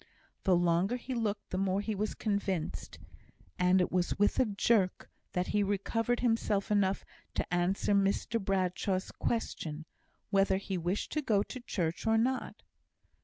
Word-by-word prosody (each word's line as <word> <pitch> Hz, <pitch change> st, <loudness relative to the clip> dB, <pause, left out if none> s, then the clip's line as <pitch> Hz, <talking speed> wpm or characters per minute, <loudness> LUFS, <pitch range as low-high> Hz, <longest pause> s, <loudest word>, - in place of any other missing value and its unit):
The 185 Hz, -, +5 dB
longer 175 Hz, +5 st, +2 dB
he 250 Hz, +1 st, -5 dB
looked 220 Hz, -3 st, -2 dB
the 185 Hz, -, -1 dB
more 195 Hz, 0 st, +1 dB
he 215 Hz, +2 st, -2 dB
was 210 Hz, +1 st, -2 dB
convinced; 200 Hz, -6 st, -2 dB, 0.6 s
and 180 Hz, +1 st, +4 dB
it 180 Hz, -, +1 dB
was 180 Hz, -1 st, 0 dB
with 205 Hz, +5 st, +2 dB
a 260 Hz, -, +5 dB
jerk 200 Hz, -2 st, +1 dB, 0.2 s
that 180 Hz, 0 st, -1 dB
he 210 Hz, -, +2 dB
recovered 205 Hz, +4 st, 0 dB
himself 225 Hz, -4 st, +1 dB
enough 200 Hz, -2 st, +2 dB, 0.3 s
to -, -, -2 dB
answer 180 Hz, +3 st, +1 dB
Mr 200 Hz, +2 st, +1 dB
Bradshaw's 190 Hz, -1 st, 0 dB
question, 160 Hz, -9 st, -3 dB, 0.5 s
whether 195 Hz, -1 st, +3 dB
he 195 Hz, 0 st, -4 dB
wished 180 Hz, +3 st, -2 dB
to 305 Hz, -, 0 dB
go 210 Hz, -7 st, +2 dB
to 255 Hz, -, -8 dB
church 175 Hz, -6 st, -2 dB
or 225 Hz, 0 st, +4 dB
not. 255 Hz, +3 st, -1 dB
200 Hz, 155 wpm, -32 LUFS, 185-220 Hz, 0.6 s, The